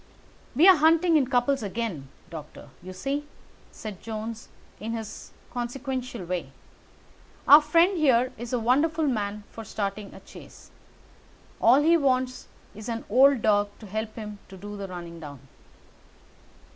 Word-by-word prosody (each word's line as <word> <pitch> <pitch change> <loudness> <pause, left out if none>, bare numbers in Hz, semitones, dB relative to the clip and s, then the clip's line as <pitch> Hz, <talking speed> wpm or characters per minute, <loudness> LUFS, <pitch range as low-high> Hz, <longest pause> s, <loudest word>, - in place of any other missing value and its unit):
"We're 355 +6 +7
hunting 325 +2 +4
in 280 -4 +3
couples 260 +1 +1
again, 205 -9 -4 0.2
Doctor, 150 -3 -10
you 185 +2 -9
see," 275 +10 -3 0.4
said 210 -4 -8
Jones 225 +1 -6 0.3
in 225 +2 -4
his 225 -2 -7 0.2
consequential 250 -3 -4
way. 170 -6 -4 1.0
"Our 295 +2 +10
friend 335 +5 +3
here 255 -3 +3
is 235 +1 -7
a 250 - +1
wonderful 300 +7 +2
man 210 -5 -2
for 225 - -8
starting 200 -1 -4
a - - -10
chase. - - -15 0.9
All 260 +6 +6
he 335 +2 +5
wants 255 -3 0 0.3
is 215 +3 -8
an 230 0 -4
old 265 0 +5
dog 205 -1 +3
to 220 - -12
help 215 +2 -4
him 210 -2 -7
to 190 - -11
do 205 +2 -8
the 200 -1 -6
running 170 -2 -8
down." 145 -4 -10
230 Hz, 145 wpm, -26 LUFS, 205-275 Hz, 1.0 s, Our